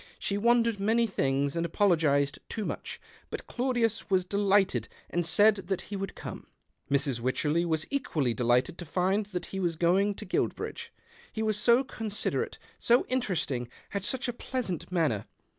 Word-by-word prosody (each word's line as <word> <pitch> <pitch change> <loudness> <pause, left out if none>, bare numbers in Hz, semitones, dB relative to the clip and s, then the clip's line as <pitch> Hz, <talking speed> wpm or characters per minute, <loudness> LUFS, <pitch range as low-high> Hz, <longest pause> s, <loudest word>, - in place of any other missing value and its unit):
She 200 - -2
wondered 230 0 +3
many 225 +4 +3
things, 140 -7 0
and 170 - 0
apologized 155 -6 +2
too 215 -2 -3
much; - - -5 0.3
but - - -6
Claudius 240 -5 0
was 185 -2 +2
delighted 195 - +2 0.2
and 175 -1 0
said 205 +5 +5
that 190 -1 -1
he - - -1
would 195 -1 -4
come. - - -8 0.4
Mrs. 140 -3 +1
Wycherley 150 +7 +1
was 160 -2 0
equally 155 - 0
delighted 125 +6 +1
to 175 - -6
find 190 +5 +1
that 180 -4 -4
he 195 - -2
was 175 -3 0
going 190 +5 +2
to - - -7
Guilbridge. - - -2 0.4
He 220 - -3
was 215 -1 +1
so 235 +4 +5
considerate, 220 -5 -2 0.2
so 240 +1 +4
interesting, 180 - -1 0.2
had 200 -1 -2
such 255 +5 -2
a 245 - -2
pleasant 230 - -4
manner. 155 - +1
190 Hz, 160 wpm, -29 LUFS, 155-220 Hz, 0.4 s, said